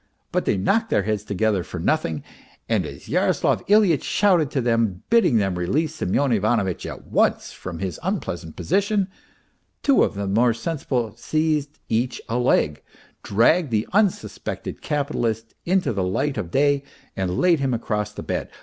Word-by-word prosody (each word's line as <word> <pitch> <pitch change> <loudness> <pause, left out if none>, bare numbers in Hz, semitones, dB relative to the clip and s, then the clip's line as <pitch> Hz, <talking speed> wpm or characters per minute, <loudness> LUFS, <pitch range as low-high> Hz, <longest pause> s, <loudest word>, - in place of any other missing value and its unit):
But - - 0
they - - +1
knocked 225 - +1
their 105 - +2
heads 105 0 -1
together 105 -2 0
for - - -7
nothing, 80 -2 0 0.4
and - - +1
as - - -11
Yaroslav - - +1
Ilyitch 200 -7 +4
shouted 180 -8 +3
to 140 - -1
them, 115 -6 0
bidding 230 - +5
them 100 -3 +1
release 150 - 0
Semyon 140 - 0
Ivanovitch 105 -4 +1
at - - -8
once - - +1
from 90 -2 -7
his 95 -2 -4
unpleasant 80 -1 -3
position, 200 +2 +1 0.7
two 280 -2 +4
of - - -1
the 100 0 -3
more 115 +4 +3
sensible 120 -4 -2
seized 155 +2 -1
each 120 +2 0
a 120 +2 -1
leg, 75 - +2 0.4
dragged 140 - +3
the 110 -1 0
unsuspected 205 -2 -1
capitalist 120 -7 -2
into 185 -7 +1
the 100 - -1
light 130 +10 0
of 105 -8 -4
day 140 +5 +2 0.3
and 95 -2 -2
laid 175 -3 +4
him 135 -1 0
across 105 -3 -2
the - - -8
bed. - - -3
120 Hz, 160 wpm, -23 LUFS, 100-155 Hz, 0.7 s, bidding